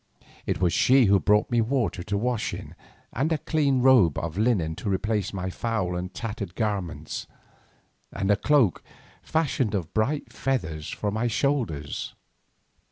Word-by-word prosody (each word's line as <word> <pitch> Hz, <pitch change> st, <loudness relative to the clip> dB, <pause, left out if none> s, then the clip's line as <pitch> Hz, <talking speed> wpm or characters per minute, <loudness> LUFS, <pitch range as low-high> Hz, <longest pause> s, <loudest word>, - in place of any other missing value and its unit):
It -, -, -1 dB
was 90 Hz, -2 st, +2 dB
she 130 Hz, -1 st, +5 dB
who 100 Hz, -1 st, +5 dB
brought 105 Hz, +4 st, +2 dB
me 120 Hz, -1 st, +3 dB
water 115 Hz, -5 st, 0 dB
to 100 Hz, +3 st, -2 dB
wash 120 Hz, 0 st, -1 dB
in, -, -, -9 dB, 0.4 s
and 145 Hz, +7 st, 0 dB
a 160 Hz, -, +2 dB
clean 140 Hz, -4 st, +1 dB
robe 120 Hz, -, +5 dB
of 85 Hz, -1 st, -3 dB
linen 100 Hz, -7 st, +1 dB
to -, -, -3 dB
replace 100 Hz, 0 st, 0 dB
my 95 Hz, -1 st, -4 dB
foul 100 Hz, -5 st, -2 dB
and 90 Hz, +1 st, -4 dB
tattered 105 Hz, -6 st, -5 dB
garments, 90 Hz, -9 st, -3 dB, 0.8 s
and 100 Hz, +1 st, 0 dB
a -, -, +5 dB
cloak 120 Hz, -, +2 dB, 0.4 s
fashioned 140 Hz, -8 st, 0 dB
of 85 Hz, -5 st, -3 dB
bright 135 Hz, +7 st, -1 dB
feathers 80 Hz, -, -2 dB
for 105 Hz, -, -2 dB
my 110 Hz, +3 st, 0 dB
shoulders. 115 Hz, -, -1 dB
105 Hz, 155 wpm, -26 LUFS, 90-125 Hz, 0.8 s, she